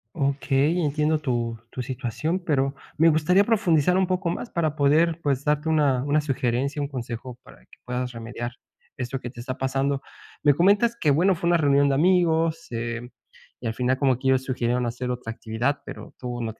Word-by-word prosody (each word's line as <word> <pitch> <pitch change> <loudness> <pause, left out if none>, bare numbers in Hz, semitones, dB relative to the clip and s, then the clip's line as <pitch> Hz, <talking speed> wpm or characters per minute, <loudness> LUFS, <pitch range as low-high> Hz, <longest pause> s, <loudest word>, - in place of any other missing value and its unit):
Okey, 140 +3 +1
entiendo 150 +2 +1
tu 120 -4 -2
tu 125 - -5
situación, 130 - -2
pero 140 -5 0 0.2
me 165 +1 +5
gustaría 180 +6 +3
profundizar 180 -6 +2
un 190 - +2
poco 185 -1 -1
más 230 +7 -5
para 160 -3 0
poder, 155 +3 +3
pues, 140 -1 0
darte 150 +1 +1
una 145 -5 +2
una 145 +2 +2
sugerencia, 135 +1 -1
un 140 - -2
consejo 125 -1 -6
para - - -16
que - - -21
puedas 125 0 -3
remediar 120 +1 -6 0.4
esto 125 +1 -4
que 120 - -6
te 120 - -16
está 130 +1 -5
pasando. 135 +1 0 0.4
Me 145 -2 +5
comentas 205 +8 +3
que, 150 - +2
bueno, 180 +7 +4
fue 170 +1 -1
una 175 - +4
reunión 140 -2 +4
de 140 - +2
amigos, 165 0 +2
eh, 115 +1 -4 0.5
y 120 - -6
al 110 - -1
final 125 +2 0
como 130 -4 +2
que 130 - -1
ellos 130 0 +3
sugirieron 125 -1 -1
hacer 125 +2 -3
otra 125 -2 -4
actividad, 120 +6 -2
pero - - -10
tú 125 -1 -5
no 110 -1 -3
140 Hz, 190 wpm, -25 LUFS, 125-160 Hz, 0.5 s, me